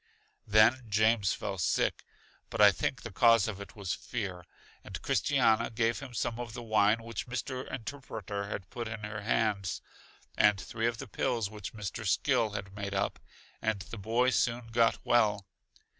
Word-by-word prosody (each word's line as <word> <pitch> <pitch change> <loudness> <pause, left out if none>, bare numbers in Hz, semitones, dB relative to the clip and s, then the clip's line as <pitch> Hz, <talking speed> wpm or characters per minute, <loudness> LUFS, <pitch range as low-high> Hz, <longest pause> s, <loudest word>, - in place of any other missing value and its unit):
Then 110 +4 +5
James 110 -2 +3
felt 95 -3 -4
sick, - - +1 0.5
but - - -5
I - - +9
think - - -2
the - - -6
cause 115 -3 +5
of 100 -2 -5
it 100 - -10
was 100 -4 -3
fear, 95 -7 -5 0.4
and - - -7
Christiana 110 -1 +2
gave 115 0 0
him 130 -4 -9
some 115 +1 -2
of 120 -2 -5
the 120 - -6
wine 110 0 +3
which 115 +1 -5
Mr. 125 +1 -4
Interpreter 110 -6 -5
had 100 -2 -5
put 120 -2 -4
in 110 -1 -6
her 105 0 -5
hands, 105 -3 0 0.6
and 105 -1 +4
three 115 +2 -2
of 120 -1 -1
the 135 - -7
pills 115 -2 -1
which 105 -1 -7
Mr. 105 +1 -5
Skill 115 0 +2
had 100 -1 -6
made 100 -1 -4
up, 100 +1 -1 0.4
and 110 -3 0
the 105 +5 -8
boy 115 +5 +2
soon 120 -1 0
got 115 0 +3
well. 105 -4 +3
110 Hz, 175 wpm, -31 LUFS, 100-120 Hz, 0.6 s, I